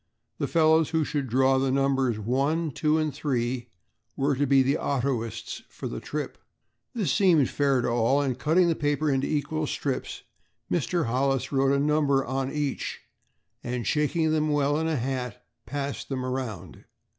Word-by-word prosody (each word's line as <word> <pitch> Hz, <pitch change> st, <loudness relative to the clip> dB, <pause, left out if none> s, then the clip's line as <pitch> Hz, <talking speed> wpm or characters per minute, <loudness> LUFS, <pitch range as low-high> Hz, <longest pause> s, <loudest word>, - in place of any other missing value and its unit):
The -, -, 0 dB
fellows 160 Hz, -1 st, +4 dB
who 160 Hz, -1 st, +1 dB
should 145 Hz, -2 st, -2 dB
draw 130 Hz, +2 st, +3 dB
the 135 Hz, 0 st, +1 dB
numbers 135 Hz, -3 st, +1 dB
one, 140 Hz, +9 st, 0 dB
two 155 Hz, +3 st, +1 dB
and 155 Hz, -2 st, 0 dB
three 125 Hz, -4 st, -2 dB, 0.5 s
were 140 Hz, +1 st, +1 dB
to 145 Hz, +2 st, 0 dB
be 135 Hz, 0 st, +5 dB
the 135 Hz, +3 st, +1 dB
autoists 125 Hz, -5 st, -2 dB
for -, -, -7 dB
the -, -, -5 dB
trip. -, -, -5 dB, 0.6 s
This 210 Hz, -6 st, 0 dB
seemed 170 Hz, -9 st, +4 dB
fair 140 Hz, -3 st, +2 dB
to -, -, -1 dB
all, 120 Hz, +4 st, +2 dB
and 135 Hz, -3 st, 0 dB
cutting 170 Hz, +5 st, +3 dB
the 170 Hz, -, +3 dB
paper 145 Hz, 0 st, 0 dB
into 135 Hz, 0 st, 0 dB
equal 155 Hz, +1 st, -1 dB
strips 140 Hz, -2 st, -3 dB, 0.5 s
Mr. 175 Hz, 0 st, 0 dB
Hollis 135 Hz, +2 st, 0 dB
wrote 135 Hz, -1 st, +2 dB
a -, -, +1 dB
number 145 Hz, -2 st, +2 dB
on 135 Hz, +1 st, -2 dB
each 145 Hz, -2 st, -3 dB, 0.6 s
and, 120 Hz, -1 st, -3 dB
shaking 155 Hz, -, +1 dB
them 155 Hz, 0 st, +1 dB
well 145 Hz, 0 st, +2 dB
in 160 Hz, -, 0 dB
a 160 Hz, -, 0 dB
hat 125 Hz, -1 st, -4 dB, 0.2 s
passed 140 Hz, -1 st, -4 dB
them 130 Hz, -2 st, -2 dB
around. 125 Hz, -8 st, -5 dB
140 Hz, 170 wpm, -26 LUFS, 130-150 Hz, 0.6 s, be